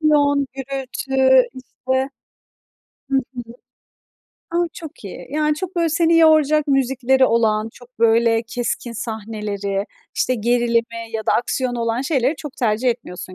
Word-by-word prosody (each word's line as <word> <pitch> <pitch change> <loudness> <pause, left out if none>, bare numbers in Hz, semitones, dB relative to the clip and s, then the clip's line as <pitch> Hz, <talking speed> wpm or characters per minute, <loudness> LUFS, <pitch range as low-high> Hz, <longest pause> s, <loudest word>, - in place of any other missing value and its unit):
Aksiyon, 285 -2 +3
gürültü, 265 -1 +2
işte 260 +1 -3 1.0
Hı 270 - +2
hı. 255 -1 -3 1.1
A! 340 - -2 0.2
Çok 315 -8 -10
iyi. 195 - -8
Yani, 300 +1 +1
çok, 365 +3 -6
böyle, 335 -1 +2
seni 330 +1 +3
yoracak 310 -2 +4
müzikleri 265 -1 +2
olan, 220 -1 +1
çok, 245 -1 -18
böyle, 230 0 +3
keskin 235 +1 -4
sahneleri, 210 -3 -4 0.3
işte, 255 - +1
gerilimi 230 0 0
ya 220 -1 -4
da - - +3
aksiyonu 245 0 -1
olan 230 +1 0
şeyleri 275 0 +1
çok 280 -1 -9
tercih 230 +1 +1
etmiyorsun 185 -6 -5
255 Hz, 130 wpm, -20 LUFS, 230-280 Hz, 1.1 s, yoracak